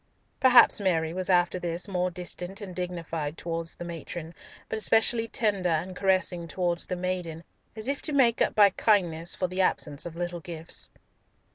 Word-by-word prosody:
Perhaps 250 -4 +7
Mary 165 -4 +1
was 185 +1 -2
after 180 0 +3
this 175 +1 -1
more 180 -2 0
distant 180 +1 -5
and 190 -4 -8
dignified 165 -4 -4
towards 165 -1 -4
the 175 - -7
matron, 170 0 -7 0.3
but 220 - -3
especially 225 +1 +3
tender 200 -5 0
and 170 +3 -1
caressing 185 -3 0
towards 175 0 -1
the 180 - -2
maiden, 180 -3 -4 0.3
as 220 +1 -6
if 275 0 -2
to 310 - -3
make 250 -5 +3
up - - +2
by 205 -2 +6
kindness 175 -6 +1
for 185 - -1
the 185 +1 -1
absence 150 -4 0
of 165 - -9
little 175 0 -4
gifts. 165 -1 -6
180 Hz, 170 wpm, -27 LUFS, 170-195 Hz, 0.3 s, Perhaps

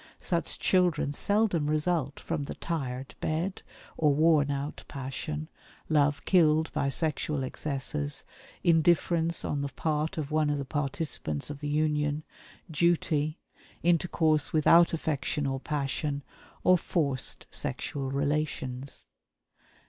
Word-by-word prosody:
Such - - -2
children 175 -6 +2
seldom 190 -2 +1
result 155 -2 0
from 145 - -3
the - - -6
"tired 135 -5 -4
bed" 170 +5 -1 0.4
or 150 -2 +4
worn 155 -2 +4
out 140 +1 -3
passion, 145 +3 -5 0.4
love 145 -2 +2
killed 160 -3 +4
by 140 - +1
sexual 150 -1 -1
excesses, 130 - -3 0.4
indifference 170 0 +3
on 145 - -1
the 140 - -1
part 155 +3 -1
of 150 -2 -3
one 155 -1 +2
of 145 - +1
the 140 - -3
participants 140 - -2
of 145 - -7
the 145 0 -3
union, 150 0 +1 0.5
"duty" 155 -1 +1 0.5
intercourse 160 -2 +2
without 165 +2 +6
affection 150 -2 -1
or 135 -1 -1
passion, 140 0 -2 0.4
or 185 -1 +5
forced 140 -7 -1
sexual 135 -2 -3
relations. 140 -2 -2
150 Hz, 120 wpm, -29 LUFS, 140-160 Hz, 0.5 s, without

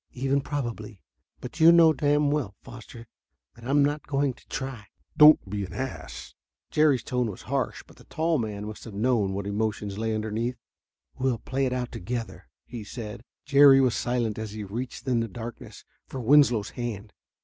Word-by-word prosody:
"Even 135 +2 0
probably. 115 -8 -5 0.4
But 125 +6 -8
you 160 +1 +8
know 165 -2 +6
damn 145 0 +2
well, 140 -10 -2
Foster, 115 0 -11 0.5
that 115 - -15
I'm 140 +2 +3
not 145 +1 -3
going 140 -2 0
to - - -23
try." 130 -6 -6 0.3
"Don't 150 -7 +7
be 100 +1 -3
an 95 - -8
ass." 130 -1 -6 0.4
Jerry's 150 -6 +3
tone 125 -2 -1
was 100 - -9
harsh, - - -2
but - - -19
the - - -17
tall 160 -1 0
man 105 -2 -4
must 110 0 -8
have 110 -4 -9
known 105 -3 +1
what 100 0 -4
emotions 105 -1 -2
lay 110 0 -1
underneath. 110 +3 -2 0.6
"We'll 130 -2 +1
play 135 +3 -2
it - - -3
out 125 -1 -3
together," 115 0 -6 0.2
he 120 -3 -8
said. 110 +1 -8 0.2
Jerry 140 -1 +7
was 130 -3 +3
silent 120 -4 -1
as 110 -2 -6
he 105 -1 -6
reached 120 +7 -6
in 125 -2 +2
the 115 - -1
darkness 115 +3 -9 0.2
for 135 - -6
Winslow's 120 -4 +4
hand. 110 -4 -6
120 Hz, 180 wpm, -26 LUFS, 110-135 Hz, 0.6 s, you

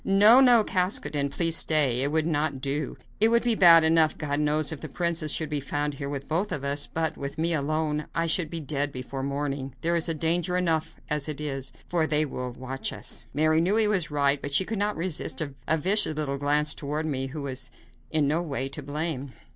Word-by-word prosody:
"No, 210 +5 +7
no; 245 -4 +6
Caskoden, 155 -7 0
please 165 +3 +1
stay; 140 -7 +3
it 140 +2 0
would 160 0 +1
not 150 -3 -1
do. 140 +2 -3 0.2
It 220 - +5
would 235 +1 +2
be 240 -1 +2
bad 170 -5 +7
enough, 160 -1 +3
God 145 -1 -2
knows, 150 +1 +1
if 160 - -7
the 155 - -7
princess 165 -1 0
should 155 0 -2
be 150 - -1
found 145 +1 -3
here 140 0 -6
with 140 -1 -6
both 180 +7 -1
of 140 - -3
us; 140 +1 -1
but, 160 -1 -2
with 140 0 -6
me 165 +2 +1
alone, 150 0 -1
I 165 - +1
should 165 0 +1
be 165 0 -5
dead 145 -1 -2
before 130 +1 -6
morning. 140 -1 -4
There 170 +1 0
is 170 0 0
danger 165 +2 0
enough 165 -3 -1
as 150 -1 -1
it 150 - -5
is, 135 -3 -3 0.2
for 165 -3 0
they 155 0 +1
will 125 -3 -5
watch 130 +2 -5
us." 120 - -5
Mary 155 +3 +2
knew 185 +5 +1
he 220 -1 +5
was 185 -6 0
right, 140 -1 +1
but 140 0 -4
she 190 - +3
could 220 0 -4
not 205 -2 -1
resist 165 -1 -2
a 145 0 -2
vicious 185 0 +3
little 140 -2 -2
glance 150 +1 +1
toward 150 +2 -4
me, 135 -3 -2
who 140 +2 -7
was 135 -1 -3 0.4
in 155 -3 +2
no 155 +4 0
way 135 -5 -3
to 145 +2 -6
blame. 145 -2 -4
150 Hz, 220 wpm, -26 LUFS, 140-165 Hz, 0.4 s, No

